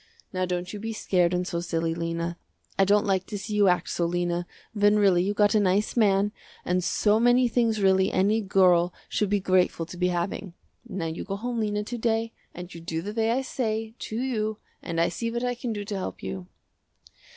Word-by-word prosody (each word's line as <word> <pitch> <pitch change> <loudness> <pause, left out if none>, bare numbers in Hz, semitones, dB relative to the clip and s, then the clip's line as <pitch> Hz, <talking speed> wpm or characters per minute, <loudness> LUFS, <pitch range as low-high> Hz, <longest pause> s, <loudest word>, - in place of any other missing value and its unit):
Now 185 0 0
don't 180 +1 -3
you 210 - -5
be 225 +2 -4
scared 180 -5 +1
and 180 0 0
so 170 -2 -2
silly 165 -1 -1
Lena. 170 +1 -3 0.4
I 195 - +6
don't 205 +2 +3
like 190 -2 0
to 210 - -4
see 210 +2 -6
you 205 -1 +4
act 180 -1 +2
so 170 - 0
Lena 175 0 -1 0.3
when 205 0 +4
really 195 -4 +4
you 200 +3 -1
got 205 0 +4
a 215 - +4
nice 200 +1 +1
man 205 -3 +3 0.3
and 180 0 +1
so 210 +3 +2
many 245 +1 +4
things 230 -2 +1
really 190 0 +4
any 205 +4 +2
girl 180 -3 +3
should 210 - 0
be 205 0 +2
grateful 185 -3 +2
to 175 - -10
be 180 0 +2
having. 175 +1 -3 0.3
Now 185 -5 -3
you 160 +1 -4
go 195 - -4
home 235 +3 -3
Lena 210 -1 -1
to 240 +3 -5
day 225 0 0 0.2
and 180 +1 -8
you 165 - -9
do 165 0 -4
the 205 +2 -5
way 225 0 +1
I 255 +3 +1
say, 220 -4 -2
to 220 - -4
you, 220 -4 -1 0.2
and 165 0 -3
I 170 - +4
see 230 +7 -3
what 235 +1 -3
I 245 0 0
can 245 -1 -4
do 205 -2 -4
to 205 - -4
help 190 - -5
you." 185 -2 -5
195 Hz, 220 wpm, -26 LUFS, 180-220 Hz, 0.4 s, I